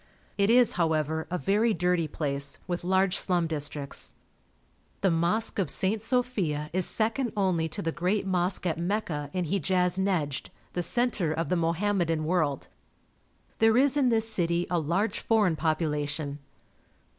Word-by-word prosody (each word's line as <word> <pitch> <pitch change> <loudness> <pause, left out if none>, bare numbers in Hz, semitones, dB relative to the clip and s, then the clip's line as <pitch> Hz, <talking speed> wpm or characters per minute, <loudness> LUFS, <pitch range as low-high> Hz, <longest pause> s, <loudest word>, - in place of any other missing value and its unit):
It 200 0 +2
is, 245 0 +5
however, 160 -1 0
a 180 - -1
very 210 +4 +1
dirty 180 -2 +1
place, 140 -2 -2
with 175 -1 -3
large 190 +1 +2
slum 175 -3 +3
districts. 145 -3 -3 0.9
The 195 - +3
Mosque 175 +8 +1
of 180 -7 0
St. 200 +7 +1
Sophia 210 - -1
is 185 -1 +3
second 230 +2 0
only 175 -5 +1
to - - -4
the 165 - -1
great 180 +5 -1
mosque 185 0 -1
at 170 -2 -1
Mecca, 170 -6 -2
in 180 +1 -2
Hejaz 180 +1 0
Nejd, 165 -8 -1 0.3
the 175 - -1
centre 210 -3 0
of 160 -1 -2
the - - +2
Mohammedan 170 -1 0
world. 155 -5 0 0.9
There 225 +1 +4
is 275 +1 +4
in 275 -4 +3
this 225 -1 +2
city 175 -5 0
a 175 - +2
large 175 +8 -1
foreign 210 -7 +2
population. 150 -2 -2
180 Hz, 150 wpm, -27 LUFS, 160-205 Hz, 0.9 s, is